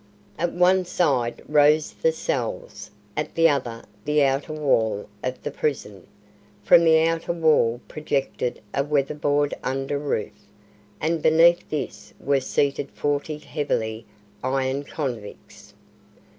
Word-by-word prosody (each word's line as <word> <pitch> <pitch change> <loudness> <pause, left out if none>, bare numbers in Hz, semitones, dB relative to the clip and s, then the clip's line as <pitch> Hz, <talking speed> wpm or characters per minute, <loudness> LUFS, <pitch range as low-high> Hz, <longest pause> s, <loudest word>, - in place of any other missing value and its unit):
At 175 +1 0
one 185 +1 +4
side 140 -10 0
rose 150 +1 +4
the 485 - +1
cells, - - -4 0.3
at - - -3
the 165 0 +5
other 125 -6 -1 0.2
the 150 0 +2
outer 135 +2 0
wall 115 -9 +1 0.2
of 130 0 -4
the - - -3
prison. 105 - -3 0.6
From 170 - +6
the 160 -1 +6
outer 165 +1 0
wall 155 -8 +3
projected 140 -4 -3
a 140 - +1
weatherboard 145 0 0
under 135 +2 -2
roof, 135 -7 -4 0.5
and 160 0 0
beneath 170 +3 +4
this 105 -9 -5
were 140 0 +1
seated 140 +1 0
forty 145 +1 -2
heavily 115 -7 -3 0.4
ironed 135 +2 -1
convicts. 120 -9 -7
145 Hz, 120 wpm, -24 LUFS, 130-160 Hz, 0.6 s, From